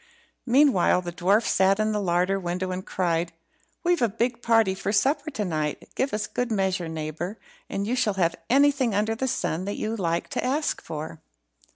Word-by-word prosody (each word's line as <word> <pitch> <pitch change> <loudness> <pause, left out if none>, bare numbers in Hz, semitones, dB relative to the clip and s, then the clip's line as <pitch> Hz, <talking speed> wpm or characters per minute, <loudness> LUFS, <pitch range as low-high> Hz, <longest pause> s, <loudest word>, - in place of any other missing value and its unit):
Meanwhile 245 -9 +4
the 175 - -4
dwarf 195 +6 +2
sat 195 +2 +3
in 215 0 +1
the 210 -1 -1
larder 180 +1 +1
window 180 +1 -3
and 185 0 -4
cried 170 -3 -1 0.5
"We've 350 -3 +2
a 235 - +3
big 235 +3 -1
party 225 -5 +3
for 195 +1 -3
supper 280 +8 +1
to 220 -8 -3
night; 155 -4 -3
give 270 - -1
us 210 0 -1
good 245 +2 -3
measure, 190 -4 0
neighbour, 160 +5 -4 0.3
and 200 - -2
you 235 +4 0
shall 215 -5 +1
have 170 -3 +1
anything 275 -4 +3
under 215 +2 +1
the 260 +4 -2
sun 180 -7 -1
that 205 - -3
you 220 +1 -2
like 170 -5 -1
to - - -2
ask 285 +5 0
for." 150 - -7
200 Hz, 190 wpm, -25 LUFS, 175-235 Hz, 0.5 s, Meanwhile